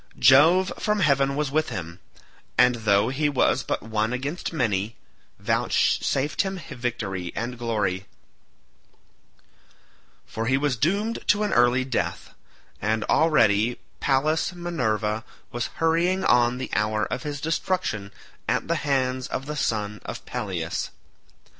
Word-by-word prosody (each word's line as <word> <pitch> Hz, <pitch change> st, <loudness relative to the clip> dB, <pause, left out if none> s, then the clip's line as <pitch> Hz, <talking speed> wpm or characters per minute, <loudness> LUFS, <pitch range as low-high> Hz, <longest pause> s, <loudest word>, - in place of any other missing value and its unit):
Jove 165 Hz, +8 st, +6 dB
from 210 Hz, -1 st, 0 dB
heaven 140 Hz, -3 st, +3 dB
was 145 Hz, -1 st, -1 dB
with 155 Hz, +2 st, +1 dB
him, 85 Hz, -1 st, -6 dB, 0.6 s
and 125 Hz, 0 st, +6 dB
though 105 Hz, -1 st, +2 dB
he 145 Hz, +3 st, 0 dB
was 140 Hz, -, +2 dB
but -, -, -3 dB
one 110 Hz, +1 st, -1 dB
against 140 Hz, +7 st, -3 dB
many, 115 Hz, -, -1 dB, 0.4 s
vouchsafed 140 Hz, +2 st, +1 dB
him 190 Hz, -1 st, -3 dB
victory 105 Hz, -7 st, -3 dB
and 120 Hz, +2 st, -3 dB
glory; 105 Hz, -5 st, -2 dB, 2.2 s
for 115 Hz, 0 st, -4 dB
he 130 Hz, +2 st, +3 dB
was 140 Hz, -2 st, 0 dB
doomed 200 Hz, -, 0 dB
to 210 Hz, 0 st, +3 dB
an 210 Hz, -, 0 dB
early 120 Hz, +1 st, +4 dB
death, 130 Hz, -2 st, -3 dB, 0.5 s
and 110 Hz, +1 st, 0 dB
already 115 Hz, -8 st, +3 dB, 0.2 s
Pallas 155 Hz, +6 st, +1 dB
Minerva 110 Hz, -, -1 dB, 0.3 s
was 120 Hz, 0 st, -2 dB
hurrying 170 Hz, +3 st, +1 dB
on 120 Hz, 0 st, +4 dB
the 130 Hz, -, -5 dB
hour 105 Hz, 0 st, +1 dB
of -, -, -3 dB
his 145 Hz, -2 st, -4 dB
destruction 155 Hz, -, -2 dB, 0.4 s
at -, -, 0 dB
the 170 Hz, -, +1 dB
hands 130 Hz, -3 st, 0 dB
of 135 Hz, -, -4 dB
the 150 Hz, +1 st, -4 dB
son 105 Hz, -6 st, -2 dB
of -, -, -7 dB
Peleus. -, -, -3 dB
130 Hz, 130 wpm, -25 LUFS, 110-155 Hz, 2.2 s, Jove